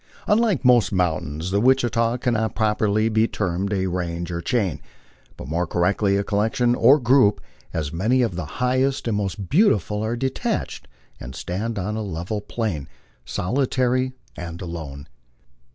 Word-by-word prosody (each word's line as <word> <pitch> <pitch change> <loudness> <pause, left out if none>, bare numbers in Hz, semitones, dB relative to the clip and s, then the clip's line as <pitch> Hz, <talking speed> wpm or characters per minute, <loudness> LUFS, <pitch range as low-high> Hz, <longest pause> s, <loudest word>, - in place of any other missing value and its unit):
Unlike 210 - +2
most 125 -2 +5
mountains, 85 -2 -1
the 100 +1 +2
Wichita 120 -2 +2
cannot 110 -3 -1
properly 110 0 +1
be 110 0 +2
termed 95 +1 -2
a 95 -2 0
range 85 -1 -3
or 85 0 -3
chain, 95 - -1 0.6
but - - -8
more 85 +4 -1
correctly 100 +4 +1
a 100 - 0
collection 110 +4 +1
or 140 +4 +5
group, 125 -4 +4 0.3
as 75 -3 -3
many 115 +9 +2
of 110 -7 -1
the 85 -2 -3
highest 130 +1 +1
and 115 - 0
most 100 -1 -3
beautiful 110 - +2
are 110 +2 -1
detached, 130 +2 -3 0.3
and 65 +1 -8
stand 105 +9 -3
on 100 +3 -2
a 110 - -2
level 95 +2 -4
plain 105 - -3 0.4
"solitary 130 - 0 0.2
and 85 -1 -7
alone." 80 -5 -7
105 Hz, 150 wpm, -23 LUFS, 90-120 Hz, 0.6 s, most